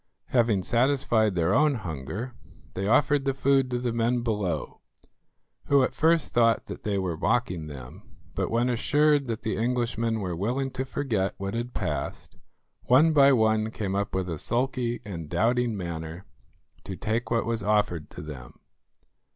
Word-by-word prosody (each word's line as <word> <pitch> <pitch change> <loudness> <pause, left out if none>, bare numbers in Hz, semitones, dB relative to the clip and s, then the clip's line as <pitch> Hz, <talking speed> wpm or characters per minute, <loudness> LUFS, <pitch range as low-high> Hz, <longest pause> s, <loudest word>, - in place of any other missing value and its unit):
Having 115 -6 +2
satisfied 120 -3 +2
their 85 -2 +2
own 145 +1 +4
hunger, 95 - -5 0.4
they 95 +1 -3
offered 145 +4 +3
the 135 -1 0
food 135 -1 +2
to 125 - -1
the 120 -1 -2
men 120 +1 +1
below, 100 - -2 0.8
who 140 -2 +4
at - - -1
first 165 0 +2
thought 115 -1 +3
that - - -8
they 105 -2 -1
were 90 -3 -1
mocking 90 -4 0
them; 65 -4 -10 0.3
but - - -2
when 120 +2 +1
assured 145 +3 +2
that 115 -2 -4
the 110 - -1
Englishmen 115 -1 0
were 90 -4 -3
willing 125 +9 -1
to 130 +1 -3
forget 115 -9 -1
what 95 +1 -4
had 120 +1 -4
passed, - - -4 0.5
one 150 +6 +5
by 140 -2 +6
one 110 -3 +2
came 105 -4 -4
up 100 0 -2
with 95 -1 -1
a 80 -4 -4
sulky 120 - -1
and 85 -6 -6
doubting 120 0 +1
manner 85 0 -6 0.6
to 95 - -6
take 110 +4 -2
what 115 -1 +1
was 115 0 -1
offered 105 -6 0
to - - -9
them. 65 -6 -10
115 Hz, 165 wpm, -26 LUFS, 95-125 Hz, 0.8 s, by